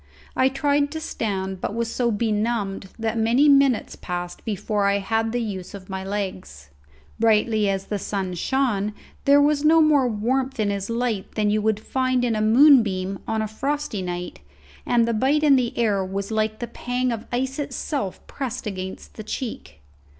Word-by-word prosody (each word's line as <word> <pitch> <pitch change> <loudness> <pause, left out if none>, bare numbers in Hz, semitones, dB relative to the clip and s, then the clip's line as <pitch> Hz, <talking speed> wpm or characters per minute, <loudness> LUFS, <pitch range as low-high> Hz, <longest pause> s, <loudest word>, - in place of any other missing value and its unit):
I 260 - +4
tried 285 +1 +1
to 320 - -3
stand, 190 - -3
but 205 - -3
was 230 -1 -2
so 245 -2 +1
benumbed 210 -2 -1
that 225 0 -1
many 235 +6 +4
minutes 275 -4 +4
passed 175 -1 -5
before 210 -1 -1
I 200 0 +3
had 225 +3 -1
the 240 0 -1
use 190 -3 -6
of 190 -1 -11
my 190 0 -4
legs. 95 - -5 0.5
Brightly 220 -1 +3
as 195 0 -2
the 205 - -3
sun 195 -2 -3
shone 210 0 0 0.3
there 280 +1 +6
was 290 0 +3
no 320 +2 +6
more 300 -4 +4
warmth 255 +4 -1
in 205 -2 +1
his 200 +1 -3
light 230 -4 -2
than 210 -1 +1
you 215 +1 +2
find 255 +4 0
in 230 -2 0
a 215 - 0
moon 260 +5 +7
beam 190 -2 -3
on 220 0 0
a - - -2
frosty 270 0 -3
night, 180 -1 -5 0.5
and 235 -1 +3
the 235 - +1
bite 270 +7 +2
in 290 -2 +6
the 250 -3 0
air 210 -5 +2
was 195 +2 -4
like 215 0 0
the 240 - -4
pang 245 +2 -2
of 225 -1 -5
ice 265 +3 -2
itself 275 - -3
pressed 255 -3 -5
against 190 -2 -6
the 215 - -6
cheek. 215 - -6
220 Hz, 180 wpm, -23 LUFS, 200-255 Hz, 0.5 s, moon